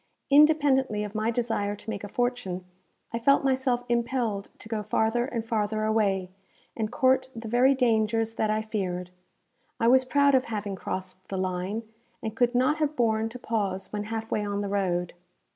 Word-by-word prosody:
Independently 280 Hz, -7 st, +4 dB
of 210 Hz, -1 st, -6 dB
my 215 Hz, +1 st, 0 dB
desire 225 Hz, -4 st, -1 dB
to 215 Hz, -, -10 dB
make 200 Hz, -2 st, -5 dB
a -, -, -4 dB
fortune, 245 Hz, -7 st, -2 dB, 0.5 s
I 230 Hz, -, -1 dB
felt 275 Hz, +5 st, +4 dB
myself 260 Hz, -2 st, +1 dB
impelled 235 Hz, -4 st, -1 dB
to -, -, -10 dB
go 220 Hz, -1 st, -2 dB
farther 220 Hz, +3 st, +1 dB
and 235 Hz, -4 st, -4 dB
farther 215 Hz, -1 st, -1 dB
away, 200 Hz, -4 st, +1 dB, 0.4 s
and 220 Hz, -2 st, -2 dB
court 260 Hz, +1 st, +2 dB
the 225 Hz, 0 st, -6 dB
very 250 Hz, +4 st, +4 dB
dangers 225 Hz, -2 st, +1 dB
that 220 Hz, -1 st, 0 dB
I 215 Hz, 0 st, 0 dB
feared. 180 Hz, -5 st, -3 dB, 0.7 s
I 230 Hz, -, +2 dB
was 260 Hz, +2 st, +6 dB
proud 280 Hz, +2 st, +3 dB
of 260 Hz, -1 st, +4 dB
having 205 Hz, -3 st, -3 dB
crossed 185 Hz, 0 st, -6 dB
the 195 Hz, -, -4 dB
line, 185 Hz, +4 st, -2 dB, 0.4 s
and 220 Hz, -1 st, -4 dB
could 245 Hz, 0 st, +2 dB
not 255 Hz, +5 st, +3 dB
have 305 Hz, -1 st, 0 dB
borne 225 Hz, -3 st, +1 dB
to 240 Hz, -, -8 dB
pause 205 Hz, -6 st, -2 dB
when 210 Hz, 0 st, -2 dB
half 225 Hz, +1 st, -5 dB
way 210 Hz, -, 0 dB
on 205 Hz, 0 st, -2 dB
the 200 Hz, -, -3 dB
road. 180 Hz, -3 st, -1 dB
225 Hz, 180 wpm, -27 LUFS, 205-245 Hz, 0.7 s, was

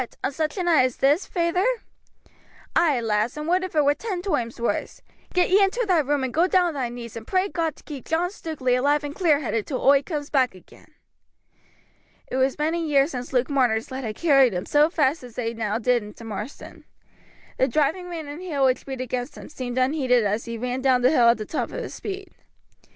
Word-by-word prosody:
on -, -, 0 dB
such 310 Hz, +4 st, -2 dB
a 370 Hz, -, -1 dB
night 335 Hz, -6 st, +4 dB
as 255 Hz, -, -3 dB
this, 290 Hz, +7 st, +2 dB
feyther?" 345 Hz, +1 st, 0 dB, 1.1 s
"Ay, 300 Hz, -7 st, +3 dB
lass, 225 Hz, +3 st, 0 dB
and 300 Hz, +1 st, -4 dB
would 365 Hz, +2 st, +2 dB
if 370 Hz, -3 st, -6 dB
it 300 Hz, -2 st, +4 dB
were 285 Hz, -, +5 dB
ten 385 Hz, +3 st, -4 dB
toimes 295 Hz, -, -2 dB
wurse. 235 Hz, -, -2 dB, 0.3 s
Get 360 Hz, 0 st, +2 dB
ye 395 Hz, +2 st, +6 dB
into 460 Hz, +5 st, +1 dB
thy 360 Hz, -4 st, +4 dB
room, 290 Hz, -1 st, 0 dB
and 260 Hz, -, -3 dB
go 340 Hz, +3 st, +3 dB
down 360 Hz, -1 st, +3 dB
on -, -, -5 dB
thy 260 Hz, -4 st, -2 dB
knees, 235 Hz, -2 st, -8 dB
and 230 Hz, -1 st, -8 dB
pray 375 Hz, +1 st, +1 dB
God 330 Hz, -5 st, -2 dB
to -, -, -19 dB
keep 285 Hz, -4 st, -8 dB
John 345 Hz, +3 st, 0 dB
Stukeley 300 Hz, -10 st, -1 dB
alive 285 Hz, +4 st, +2 dB
and 290 Hz, 0 st, -5 dB
clear 305 Hz, -4 st, +2 dB
headed 225 Hz, -5 st, -2 dB
till 265 Hz, -, -2 dB
oi 275 Hz, 0 st, +5 dB
coomes 295 Hz, -1 st, -5 dB
back 260 Hz, -7 st, +2 dB
again." 185 Hz, -, -18 dB, 1.3 s
It 255 Hz, -, -4 dB
was 265 Hz, 0 st, +1 dB
many 320 Hz, +3 st, 0 dB
years 285 Hz, +1 st, +3 dB
since 250 Hz, -2 st, -6 dB
Luke 255 Hz, -1 st, +1 dB
Marner's 245 Hz, -5 st, +1 dB
legs 260 Hz, -1 st, -4 dB
had 215 Hz, -1 st, -4 dB
carried 275 Hz, -, +4 dB
him 180 Hz, -, -3 dB
so 295 Hz, +2 st, +4 dB
fast 300 Hz, -2 st, +1 dB
as 245 Hz, -2 st, -12 dB
they 230 Hz, -2 st, -2 dB
now 220 Hz, -2 st, -2 dB
did 245 Hz, +1 st, +2 dB
into 210 Hz, +2 st, -11 dB
Marsden. 220 Hz, +4 st, -8 dB, 0.8 s
The 260 Hz, -, +4 dB
driving 310 Hz, +7 st, 0 dB
rain 325 Hz, -3 st, -6 dB
and 290 Hz, +4 st, -7 dB
hail 295 Hz, -7 st, 0 dB
which 260 Hz, +1 st, +1 dB
beat 265 Hz, -2 st, -4 dB
against 250 Hz, +1 st, -4 dB
him -, -, -10 dB
seemed 255 Hz, -4 st, -5 dB
unheeded 255 Hz, -2 st, +2 dB
as 210 Hz, +3 st, -1 dB
he 235 Hz, -1 st, -5 dB
ran 250 Hz, +2 st, -3 dB
down 255 Hz, -2 st, +3 dB
the 255 Hz, -, +5 dB
hill 240 Hz, -6 st, +5 dB
at 235 Hz, -, +4 dB
the 215 Hz, -, -5 dB
top 315 Hz, -, -3 dB
of -, -, -5 dB
his -, -, -7 dB
speed. 395 Hz, -1 st, -6 dB
275 Hz, 225 wpm, -24 LUFS, 245-325 Hz, 1.3 s, ye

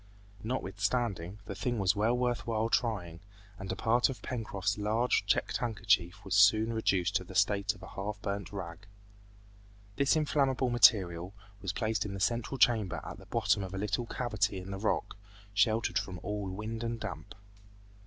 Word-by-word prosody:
Notwithstanding, 100 Hz, -4 st, -2 dB
the 100 Hz, -, -5 dB
thing 120 Hz, +5 st, -2 dB
was 95 Hz, -1 st, +2 dB
well 110 Hz, +4 st, +2 dB
worth 125 Hz, -1 st, -1 dB
while 115 Hz, 0 st, 0 dB
trying, 95 Hz, -10 st, -1 dB, 0.4 s
and 95 Hz, 0 st, -5 dB
a -, -, -2 dB
part 120 Hz, +6 st, +3 dB
of 130 Hz, -, -7 dB
Pencroft's 105 Hz, -5 st, -2 dB
large 110 Hz, +4 st, +1 dB
checked -, -, +1 dB
handkerchief 105 Hz, -4 st, 0 dB
was 95 Hz, -, -3 dB
soon 110 Hz, +3 st, +5 dB
reduced 100 Hz, -3 st, +1 dB
to 90 Hz, -, -6 dB
the 95 Hz, +1 st, -11 dB
state 100 Hz, +1 st, +2 dB
of -, -, -16 dB
a -, -, -9 dB
half 105 Hz, +1 st, -5 dB
burnt 100 Hz, -2 st, -4 dB
rag. 95 Hz, 0 st, -7 dB, 1.1 s
This 140 Hz, +2 st, +3 dB
inflammable 135 Hz, -4 st, +1 dB
material 95 Hz, -6 st, +4 dB, 0.3 s
was 95 Hz, -, -2 dB
placed 110 Hz, +2 st, -1 dB
in 100 Hz, -1 st, -5 dB
the -, -, -5 dB
central 120 Hz, +6 st, 0 dB
chamber 110 Hz, -8 st, +3 dB
at -, -, -7 dB
the -, -, -15 dB
bottom -, -, +1 dB
of 95 Hz, 0 st, -5 dB
a -, -, -3 dB
little 105 Hz, +4 st, -1 dB
cavity 110 Hz, -5 st, -1 dB
in 95 Hz, +1 st, -7 dB
the 95 Hz, -, -4 dB
rock, 105 Hz, -1 st, -1 dB, 0.4 s
sheltered 110 Hz, +2 st, +2 dB
from 90 Hz, -1 st, -6 dB
all 105 Hz, -1 st, -3 dB
wind 110 Hz, +4 st, -5 dB
and 115 Hz, 0 st, -3 dB
damp. 100 Hz, -2 st, -7 dB
105 Hz, 175 wpm, -31 LUFS, 95-115 Hz, 1.1 s, soon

